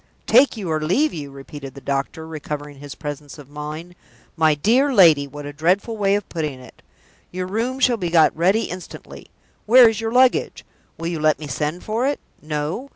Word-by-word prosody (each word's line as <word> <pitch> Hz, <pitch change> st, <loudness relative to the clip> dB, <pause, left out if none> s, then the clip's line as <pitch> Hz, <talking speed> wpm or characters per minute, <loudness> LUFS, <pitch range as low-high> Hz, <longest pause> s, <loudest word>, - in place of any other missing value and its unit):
"Take 270 Hz, -3 st, +4 dB
you 200 Hz, -4 st, -5 dB
or 155 Hz, 0 st, -1 dB
leave 260 Hz, -, +1 dB
you?" 145 Hz, -3 st, -6 dB
repeated 135 Hz, 0 st, -10 dB
the -, -, -9 dB
doctor, 140 Hz, +3 st, -3 dB
recovering 150 Hz, -2 st, -7 dB
his 145 Hz, -1 st, -9 dB
presence 145 Hz, -1 st, -7 dB
of 145 Hz, -1 st, -14 dB
mind. 150 Hz, +4 st, -7 dB, 0.4 s
"My 160 Hz, -2 st, +3 dB
dear 245 Hz, -, +2 dB
lady, 160 Hz, -, +5 dB
what 145 Hz, +1 st, -9 dB
a 145 Hz, -, -7 dB
dreadful 180 Hz, -, 0 dB
way 200 Hz, -2 st, +1 dB
of 205 Hz, -, -3 dB
putting 150 Hz, -6 st, -4 dB
it! 125 Hz, -2 st, -16 dB, 0.5 s
Your 185 Hz, 0 st, -4 dB
room 230 Hz, +7 st, -2 dB
shall 250 Hz, -2 st, +3 dB
be 180 Hz, -5 st, -3 dB
got 165 Hz, -2 st, +4 dB
ready 190 Hz, +7 st, +2 dB
instantly! 180 Hz, 0 st, -9 dB, 0.4 s
Where 245 Hz, +2 st, +8 dB
is 225 Hz, 0 st, -1 dB
your 225 Hz, 0 st, -2 dB
luggage? 255 Hz, +1 st, +2 dB, 0.3 s
Will 165 Hz, +1 st, -4 dB
you 170 Hz, -2 st, -3 dB
let 155 Hz, 0 st, +2 dB
me 155 Hz, -, -8 dB
send 150 Hz, +4 st, -3 dB
for 230 Hz, +5 st, -1 dB
it? 285 Hz, -, -1 dB, 0.2 s
No? 155 Hz, -, -4 dB
160 Hz, 195 wpm, -21 LUFS, 150-220 Hz, 0.5 s, Where